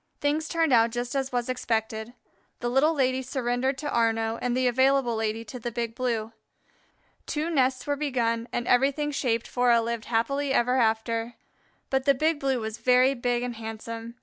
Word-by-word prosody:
Things 300 +2 0
turned 325 -4 +1
out 230 -1 +5
just 240 +1 -4
as 270 -1 -1
was 245 -1 -1
expected. 225 -2 -2 0.5
The 240 - -2
Little 300 +6 +3
Lady 260 -2 +1
surrendered 260 +1 -1
to 295 +1 -4
Arnaux 225 -1 +1
and 245 0 0
the 255 - +1
Available 260 0 +3
Lady 220 +1 -2
to 250 +3 -8
the 240 - -4
Big 230 0 -3
Blue. 230 -3 -2 0.9
Two 315 +3 -2
nests 260 -4 +1
were 290 - 0
begun 240 -5 -1
and 240 0 -3
everything 280 +4 +2
shaped 235 -5 -1
for 245 0 +1
a 235 -1 +6
"lived 230 0 -3
happily 275 +4 0
ever 250 0 +2
after." 230 0 0 0.6
But 265 0 +1
the 280 -1 +4
Big 310 +3 +1
Blue 270 -2 0
was 220 -1 -5
very 255 +1 +4
big 245 -1 -1
and 245 -2 -4
handsome. 225 +1 -7
245 Hz, 180 wpm, -26 LUFS, 230-270 Hz, 0.9 s, a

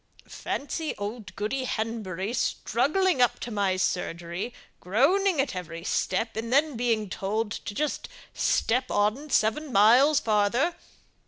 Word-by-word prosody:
"Fancy 305 +3 -4
old 210 +2 -6
Goody 255 +6 -2
Henbury 215 -3 -3
struggling 280 - +1
up 245 - +3
to 240 - -5
my 200 -3 0
surgery, 175 +2 -2 0.3
groaning 315 - +2
at 265 -6 0
every 165 -2 -6
step, 225 +6 -1
and 230 +2 -4
then 290 +1 +3
being 225 -3 0
told 210 +3 -2
to 205 - -6
just 300 +3 -2 0.2
step 250 +2 +1
on 215 +9 0
seven 270 +5 +1
miles 250 +8 +6
farther! 220 +9 +1
225 Hz, 130 wpm, -27 LUFS, 205-270 Hz, 0.3 s, miles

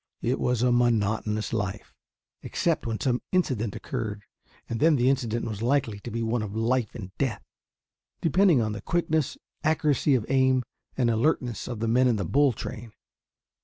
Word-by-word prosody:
It 125 +3 0
was 125 -1 +1
a 125 - +4
monotonous 110 -3 +1
life, 105 -2 -3 0.5
except - - -1
when 115 -1 -2
some 125 -2 0
incident 125 - 0
occurred, 105 -2 -4 0.4
and 115 - -3
then 160 0 +5
the 130 0 +3
incident 120 -4 -1
was 110 -2 -5
likely 120 -4 +1
to 120 - -8
be 115 +1 -3
one 115 +1 0
of 105 -1 -5
life 115 0 0
and 95 -4 -8
death, 125 -7 -1 0.8
depending 170 -4 +4
on 110 - -1
the 105 - -5
quickness, 160 -4 0 0.3
accuracy 150 -2 +2
of 115 -4 0
aim, 130 -1 +3 0.3
and 120 -3 +2
alertness 120 0 0
of 120 -4 -5
the 115 - 0
men 125 +3 +4
in 120 - +3
the 100 -3 -2
"bull 140 - +3
train." 115 0 -7
120 Hz, 170 wpm, -26 LUFS, 110-130 Hz, 0.8 s, then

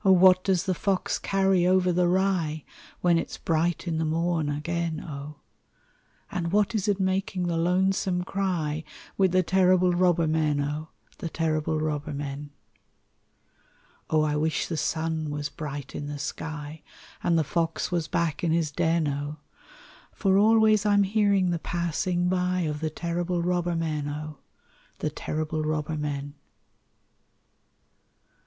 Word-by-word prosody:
what 185 -1 +6
does 190 -3 +2
the 185 - 0
fox 190 +1 -1
carry 190 -2 +2
over 185 0 +3
the 175 0 +2
rye 175 -5 +1 0.4
When 175 -2 +4
it's - - -5
bright 170 +2 0
in 160 -2 -1
the - - +1
morn 160 -1 0
again, 165 +2 -2
O! 150 -1 -7 1.0
And 170 -2 -2
what 210 +2 +2
is 215 -2 -1
it 200 -1 +1
making 190 -1 0
the 170 -1 -1
lonesome 180 +1 +1
cry 175 -6 -1 0.3
With 190 -2 +3
the 185 0 +3
terrible 185 0 +4
robber 175 -2 +3
men, 155 -2 +1
O! 150 +2 -3 0.3
The 165 - -4
terrible 155 -1 0
robber 150 -1 -2
men. 145 0 -5 1.6
O! 155 -1 +3
I 150 -1 0
wish 155 +1 0
the 165 - -3
sun 160 0 -1
was 145 0 -3
bright 145 -4 -6
in 145 - -5
the 145 0 -5
sky, 150 +1 -6 0.4
And 170 -1 +2
the 160 - +3
fox 165 +3 -1
was 170 -2 0
back 165 -2 -1
in 170 - +2
his 160 -2 +1
den, 165 0 +1
O! 145 +1 -3 0.8
For 195 -2 +2
always 215 0 +5
I'm 205 -1 +4
hearing 200 -2 +2
the 170 - -1
passing 175 +1 -1
by 180 0 +1
Of 150 -3 -2
the 160 0 -1
terrible 170 +2 -2
robber 175 -1 0
men, 155 -3 -2
O! 150 0 -6 0.6
The - - -2
terrible 155 0 -3
robber 155 0 -1
men. 145 -1 -3
170 Hz, 150 wpm, -26 LUFS, 155-185 Hz, 1.6 s, what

